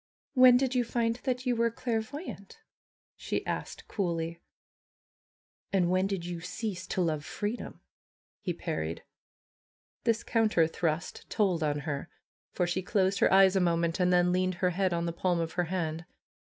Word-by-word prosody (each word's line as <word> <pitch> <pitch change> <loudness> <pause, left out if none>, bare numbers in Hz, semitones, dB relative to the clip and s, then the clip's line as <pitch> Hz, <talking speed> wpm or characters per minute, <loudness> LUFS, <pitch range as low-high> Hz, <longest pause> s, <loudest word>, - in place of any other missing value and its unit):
^^When 255 -1 +8
did 260 0 0
you 250 -1 +2
find 230 0 0
that 255 -1 -1
you 250 -1 +2
were 230 0 +2
clairvoyant?" 230 - -4 0.6
she - - -3
asked - - -4
coolly. 170 -4 -2 1.3
^^And 180 -3 +2
when 185 +1 +2
did 195 -4 -3
you 175 -1 -5
cease 185 +2 -4
to 185 - -1
love 155 -4 0
freedom?" 210 +9 -5 0.6
he 180 - -2
par 165 -1 -3
ried. 80 +1 -4 1.0
This 230 -1 +1
counter 220 -8 +3
thrust 165 0 -3
told 190 -6 +1
on 150 -1 0
her, 145 0 -4 0.4
for 180 - 0
she 175 +2 -1
closed 190 0 +1
her - - +4
eyes 190 0 +6
a - - +4
moment 170 0 +1
and 180 0 +3
then 180 0 +4
leaned 185 0 +1
her 180 +1 +1
head 185 +1 +1
on 170 0 0
the 170 - -2
palm 175 0 0
of 165 0 -2
her 180 -1 0
hand. 165 -2 -3
185 Hz, 165 wpm, -30 LUFS, 170-220 Hz, 1.3 s, ^^When